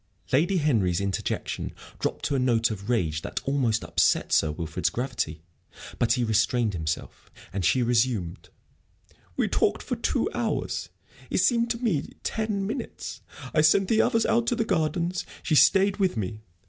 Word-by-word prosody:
Lady 170 +8 +3
Henry's 110 - +2
interjection 100 -1 -3 0.3
dropped - - -2
to - - 0
a 135 - +1
note 120 -2 +2
of 100 +1 -6
rage 80 -10 0
that - - -4
almost 130 -5 +1
upset - - +2
Sir 80 - +4
Wilfrid's 80 0 -2
gravity; 80 - -3 0.6
but 115 0 +3
he 125 -1 0
restrained 115 0 +1
himself, 80 -3 -4 0.2
and 95 -1 -2
she 125 +7 +3
resumed: 115 -7 0 0.9
"We - - +2
talked - - +1
for - - -2
two - - 0
hours; - - -2 0.4
it - - -1
seemed 235 +5 +3
to 235 - 0
me 215 - -1
ten 215 -3 -1
minutes. 225 +7 -5 0.3
I 155 - +4
sent 185 +5 +4
the 225 -1 +4
others 230 -1 +2
out 230 +1 +2
to 240 - +2
the 225 - 0
gardens. 170 -1 0 0.2
She - - -1
stayed 195 +6 +5
with 190 - +1
me. 105 +1 -4
130 Hz, 160 wpm, -26 LUFS, -, 0.9 s, stayed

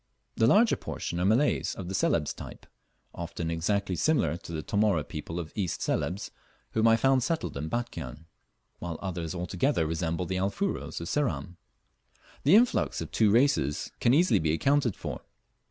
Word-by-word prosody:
The 115 - +3
larger 220 - +5
portion 85 - -4
are 90 - +1
Malays 115 +9 +2
of 95 - -6
the 95 - -4
Celebes 85 -5 +1
type, - - -10 0.5
often 85 -1 -4
exactly 95 +3 0
similar 115 - +2
to 85 - -11
the 80 -2 -4
Tomóre 100 -7 +1
people 85 +2 -5
of 80 -2 -6
East 95 -5 -2
Celebes, 100 +4 -2 0.4
whom 110 +1 +3
I 115 - +6
found 135 +3 +3
settled 165 +6 -2
in 75 +3 -4
Batchian; 120 -9 -5 0.5
while 85 -2 -5
others 85 -3 -4
altogether 90 - 0
resemble 80 +2 -2
the 95 +1 -2
Alfuros 100 - -2
of 85 - -5
Ceram. 120 -10 -1 0.9
The 155 +8 +7
influx 240 +3 +3
of - - -6
two 110 -2 +3
races 115 - +2
can 120 - +3
easily 170 +7 +4
be 80 -1 +1
accounted 135 - +2
for. - - -6
95 Hz, 165 wpm, -28 LUFS, 85-125 Hz, 0.9 s, The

